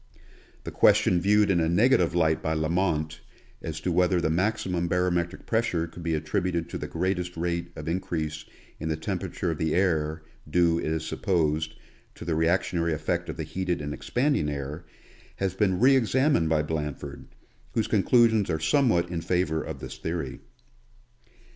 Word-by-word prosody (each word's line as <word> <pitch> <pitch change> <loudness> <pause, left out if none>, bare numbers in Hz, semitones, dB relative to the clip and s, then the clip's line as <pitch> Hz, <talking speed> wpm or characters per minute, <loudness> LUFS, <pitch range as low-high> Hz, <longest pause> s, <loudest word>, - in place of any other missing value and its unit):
The - - -6
question 90 -1 +4
viewed 105 +1 +4
in 85 - +3
a 80 -1 +1
negative 95 -2 +3
light 80 -2 +2
by 80 - -1
Lament, 80 -1 0 0.4
as 80 -2 -5
to 90 - -1
whether 90 +1 +3
the 80 -2 0
maximum 90 -1 0
barometric 90 0 0
pressure 110 -8 0
could 85 +1 -11
be 80 -1 0
attributed 85 +2 -1
to - - -5
the - - -4
greatest 90 -2 -2
rate 85 0 -2
of 75 - -8
increase 80 -3 -2 0.4
in 80 - -3
the 80 - -1
temperature 80 +2 -3
of 80 - -5
the 80 -1 0
air, 80 -4 +1 0.3
due, 85 +1 +3
it - - -3
is 80 0 -1
supposed, 80 -4 0 0.4
to - - -9
the 85 - 0
reactionary 85 0 +1
effect 75 - -2
of - - -5
the - - -3
heated 90 -2 -2
and 75 0 -4
expanding 125 - 0
air, 70 +3 -5 0.5
has 95 -2 -1
been 95 -2 +1
re 135 +4 +6
examined 130 - +2
by 80 -1 +2
Blanford, 75 -2 -5 0.5
whose 110 - +1
conclusions 110 0 +3
are 80 -1 0
somewhat 85 - +2
in 85 -2 -2
favor 80 -3 0
of - - -7
this - - -8
theory. 80 -5 -4
85 Hz, 165 wpm, -27 LUFS, 80-95 Hz, 0.5 s, re